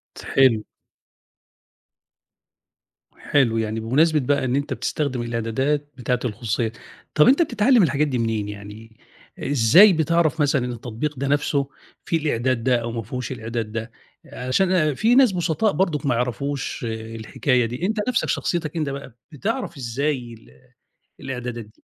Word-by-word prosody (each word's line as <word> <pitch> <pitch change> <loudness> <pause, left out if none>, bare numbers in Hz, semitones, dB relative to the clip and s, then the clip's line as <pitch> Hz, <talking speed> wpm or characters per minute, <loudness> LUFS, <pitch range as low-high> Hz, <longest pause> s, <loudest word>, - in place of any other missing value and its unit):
تحِل. 125 -5 +2 2.5
حلو، 125 -6 +1
يعني 110 0 -2
بمناسبة 150 +8 +3
بقى 140 0 0
إن 125 0 0
أنت 140 0 -1
بتستخدم 130 -2 -2
الإعدادات 130 +6 -1
بتاعة 125 0 -1
الخصوصية، 110 0 -2 0.4
طَب 150 - +6
أنت 275 +6 +5
بتتعلّم 245 - +4
الحاجات 150 -1 +1
دي 130 -3 -1
منين 110 -3 -1
يعني، 105 +2 -10 0.4
إزاي 145 - +6
بتعرف 160 0 +1
مثلًا 140 -3 +2
إن 125 - -3
التطبيق 120 +5 -4
ده 140 - -1
نَفْسه 140 -1 +1 0.4
فيه 165 - +1
الإعداد 130 -5 0
ده 125 0 +3
أو 115 0 -4
ما 115 0 -3
فيهوش 125 +5 -5
الإعداد 115 -2 -4
ده؟ 115 +1 -5 0.3
عشان 130 +10 0
آآ 155 -5 +2
في 225 - +2
ناس 260 -4 +6
بُسطاء 180 +4 +1
برضُك 165 -8 0
ما 130 - +2
يعرفوش 135 +3 -3
الحكاية 115 +3 -1
دي، 125 +9 -4
أنت 220 +3 -1
نَفْسك 250 -2 0
شخصيتك 165 -3 -1
أنت 155 -3 -1
بقى 140 -3 -7 0.2
بتعرف 200 - -3
إزاي 130 0 -2
ال 110 - -17 0.7
الإعدادات 125 -3 -5
دي؟ 105 - -25
130 Hz, 145 wpm, -22 LUFS, 115-150 Hz, 2.5 s, طَب